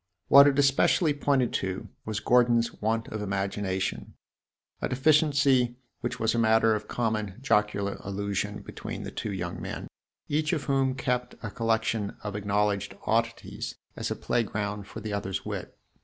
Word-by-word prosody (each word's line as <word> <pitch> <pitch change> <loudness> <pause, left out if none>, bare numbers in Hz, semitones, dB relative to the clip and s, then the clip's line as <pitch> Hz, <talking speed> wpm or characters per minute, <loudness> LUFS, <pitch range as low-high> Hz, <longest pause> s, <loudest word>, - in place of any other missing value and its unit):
What 140 +1 +9
it 140 -1 +2
especially 145 +3 +4
pointed 140 -4 +1
to 95 -1 -4 0.2
was 110 -2 -2
Gordon's 120 +1 +3
want 115 +1 0
of 110 - -4
imagination 95 -1 -2 0.7
a - - -1
deficiency 135 -3 +3 0.2
which 125 0 -3
was 110 0 +2
a 120 - +1
matter 110 0 +4
of 105 0 -3
common 110 -4 -1
jocular 105 -5 +1
allusion 100 +1 -3
between - - -6
the - - -6
two 105 - -4
young 85 -3 -4
men, - - -5 0.4
each 155 +3 0
of 155 -4 -1
whom 135 -2 +1
kept 125 -1 -1
a 110 - -4
collection 115 -2 0
of 105 -1 -4
acknowledged 100 -1 0
oddities 115 +1 -1 0.2
as - - -3
a - - -1
playground 105 -3 -2
for 110 - -8
the 105 -1 -4
other's 95 -2 -3
wit. - - -5
110 Hz, 155 wpm, -28 LUFS, 100-125 Hz, 0.7 s, What